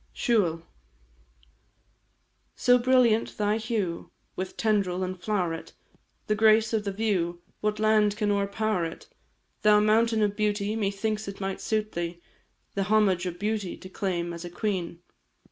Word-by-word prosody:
SIUBHAL. 180 -9 +1 1.9
So 245 0 +4
brilliant 240 -3 +3
thy 210 +1 +1
hue 215 -7 -3 0.3
With 185 0 -5
tendril 195 -4 +1
and 185 0 -3
flow'ret, 180 -6 -2 0.5
The 215 - +1
grace 220 +1 +4
of 215 -2 0
the 200 - -1
view, 185 -5 -1 0.2
What 210 0 -1
land 215 -1 +3
can 210 -2 +1
o'erpower 200 -1 0
it? - - -13 0.6
Thou 210 0 +6
mountain 220 +1 +3
of 205 -1 0
beauty, 210 0 0
Methinks 215 0 -2
it 200 - -7
might 195 -1 -3
suit 215 -1 -1
thee, 170 0 -4 0.5
The 195 -1 -1
homage 195 -4 +3
of 175 -1 -5
beauty 205 -1 -2
To 185 - -11
claim 175 -3 -2
as 170 0 -7
a 175 - -6
queen. 175 -2 -3
205 Hz, 145 wpm, -27 LUFS, 185-215 Hz, 1.9 s, Thou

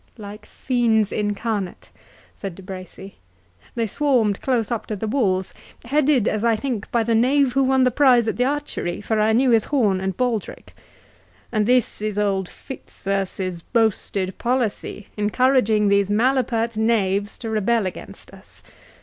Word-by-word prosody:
"Like 210 0 -10
fiends 230 -5 +1
incarnate," 205 -2 -3 0.4
said 195 -4 -7
De 195 - -12
Bracy. 190 +1 -10 0.6
"They 230 -1 0
swarmed 230 -4 +1
close 245 -4 0
up 235 - -3
to 215 - -3
the 210 - -4
walls, 195 -6 0 0.3
headed, 275 -2 +2
as 215 0 -1
I 230 -1 +3
think, 230 -2 -4
by 235 -1 +2
the 230 +1 0
knave 255 +3 +3
who 270 +1 +3
won 265 0 +3
the 255 - +3
prize 245 -3 +4
at - - -1
the 250 - +1
archery, 285 -11 -3
for 215 +1 -1
I 215 +1 +3
knew 250 +3 +3
his 225 -2 +3
horn 210 -10 +1
and 190 -1 -3
baldric. 245 -5 -3 0.8
And 215 -2 +1
this 250 -4 +2
is 215 -1 -3
old 195 -3 0
Fitzurse's 195 -7 -5
boasted 200 -4 -1
policy, 235 -4 -2
encouraging 215 0 +2
these 200 0 +2
malapert 230 0 +1
knaves 205 -2 0
to 225 -2 -6
rebel 220 0 +1
against 185 - -8
us! - - -16
220 Hz, 155 wpm, -22 LUFS, 200-245 Hz, 0.8 s, prize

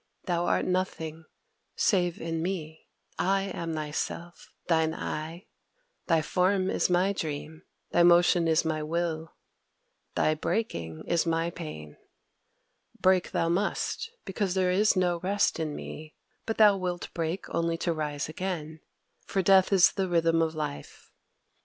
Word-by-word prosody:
Thou 175 -1 0
art - - +2
nothing 165 -3 -2 0.5
save 175 -4 +1
in 165 0 -3
me. 160 -3 -4 0.3
I 195 +1 +2
am 165 -1 -4
thy 155 -1 -4
Self, 170 +3 -5
thine 160 -2 +2
'I': 165 +4 -5 0.6
thy 165 -3 +3
form 185 +3 +1
is - - +1
my 180 +3 +3
dream; 155 -2 -5 0.3
thy 175 - +4
motion 175 0 +5
is 160 0 +3
my 155 -1 -1
will; 160 0 -2 0.8
thy 155 - +3
breaking 85 - -3
is 170 0 +1
my 165 +1 0
pain. 75 - -8 1.0
Break 185 -1 +3
thou 165 - 0
must, 195 - -1 0.2
because 195 -1 -2
there 185 -1 +2
is 205 +4 +3
no 180 -2 +1
rest 195 0 +1
in 155 -2 -2
me; 155 0 -8 0.3
but 225 - -2
thou 210 -2 +6
wilt 180 -2 -4
break 165 +2 -3
only 165 0 0
to 170 0 0
rise 150 -2 -3
again, 160 -2 -4 0.5
for 195 - 0
death 190 +1 +5
is 190 -3 +6
the 195 -2 -1
Rhythm 165 -1 +3
of 160 -1 0
Life. 150 -2 -6
170 Hz, 145 wpm, -28 LUFS, 160-185 Hz, 1.0 s, thou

